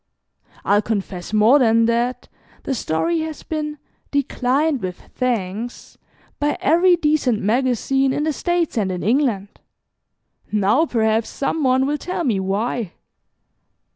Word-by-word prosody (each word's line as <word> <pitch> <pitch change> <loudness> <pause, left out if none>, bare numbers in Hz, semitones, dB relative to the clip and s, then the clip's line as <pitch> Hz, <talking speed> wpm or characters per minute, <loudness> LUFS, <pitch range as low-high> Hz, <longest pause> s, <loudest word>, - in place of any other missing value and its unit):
I'll 205 +1 +4
confess 195 -5 -4
more 220 +6 +5
than 230 -2 +4
that, 240 +2 -1 0.4
the 275 - -2
story 265 - -1
has 315 -2 -5
been 300 -1 -4 0.3
'declined 280 0 0
with 180 -1 -5
thanks' 230 -1 -3 0.4
by 295 0 0
every 350 +4 +4
decent 300 -8 +1
magazine 260 +4 +1
in 290 - -1
the 310 0 0
States 345 -5 -1
and 190 -3 0
in 180 - -4
England. 220 -4 0 0.9
Now 215 +10 +2
perhaps 220 -2 +1
some 280 +3 -2
one 260 0 +3
will 295 +1 -1
tell 360 -1 -3
me 225 -9 +1
why." 200 +1 -2
250 Hz, 130 wpm, -21 LUFS, 215-295 Hz, 0.9 s, more